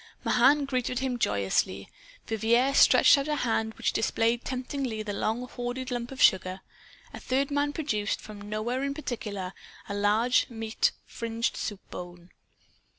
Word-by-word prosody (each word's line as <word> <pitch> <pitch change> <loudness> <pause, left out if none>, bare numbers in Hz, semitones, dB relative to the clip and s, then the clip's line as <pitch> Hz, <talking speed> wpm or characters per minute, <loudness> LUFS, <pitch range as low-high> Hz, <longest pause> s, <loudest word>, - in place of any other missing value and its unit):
Mahan 290 -1 +4
greeted 255 -2 -1
him 260 -1 -1
joyously. 100 - 0 0.4
Vivier 235 +5 +2
stretched 280 - +7
out 275 - -3
a 300 - 0
hand 220 -4 -1
which - - -1
displayed 225 +2 +1
temptingly 255 -3 -3
the 205 -1 -4
long 225 +5 -2
hoarded 250 +1 -5
lump 240 0 -3
of 265 - -9
sugar. 185 0 +3 0.5
A - - -7
third 275 +3 0
man 285 0 +1
produced, 220 -9 -1
from 210 -1 -10
nowhere 215 +5 -2
in 280 0 -2
particular, 205 -10 -5 0.3
a - - -4
large 210 +5 +2
and 235 - -11
meat 225 0 +1
fringed 230 0 -3
soup 205 -3 -4
bone. 175 0 -9
230 Hz, 150 wpm, -28 LUFS, 210-260 Hz, 0.5 s, stretched